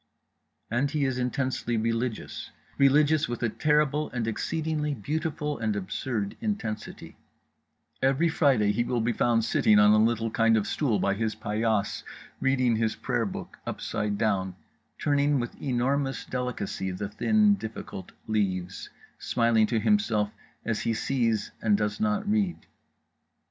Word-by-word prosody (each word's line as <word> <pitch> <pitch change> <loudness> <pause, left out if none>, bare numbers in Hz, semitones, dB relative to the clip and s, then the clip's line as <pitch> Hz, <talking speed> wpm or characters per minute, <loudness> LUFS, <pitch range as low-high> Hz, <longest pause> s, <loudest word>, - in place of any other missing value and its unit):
And 125 +5 +1
he 145 -1 0
is 130 -1 -1
intensely 125 -2 -1
religious, 115 +1 -2 0.3
religious 145 +2 +4
with 120 0 -4
a 115 - +2
terrible 150 +3 +1
and 120 -2 -3
exceedingly 150 +5 -1
beautiful 150 - -3
and 110 -2 0
absurd 100 +2 -3
intensity… 205 - -4 0.8
every 135 +5 +3
Friday 135 -10 +3
he 120 +3 +1
will 120 0 -1
be 115 +1 +1
found 115 -1 +2
sitting 105 -1 +4
on 105 0 +7
a 110 0 +5
little 115 0 +1
kind 115 0 +3
of 105 - 0
stool 125 -9 0
by 100 - +1
his 110 +1 -2
paillasse 110 -1 -1 0.4
reading 130 -4 +2
his 110 -1 0
prayer 120 -4 -1
book 95 - -8
upside 105 -1 -2
down; 95 -4 0 0.4
turning 145 -1 +2
with 120 -1 -5
enormous 135 0 0
delicacy 125 -6 -3
the 95 +2 -4
thin 215 - +3
difficult 110 - -6
leaves, 95 -4 -2 0.3
smiling 115 -2 +2
to 115 -1 +1
himself 110 - +2 0.3
as 115 -1 -1
he 115 - 0
sees 115 -4 0
and 105 -2 +3
does 105 - -2
not 210 -1 0
read. 205 -4 0
120 Hz, 140 wpm, -27 LUFS, 110-145 Hz, 0.8 s, on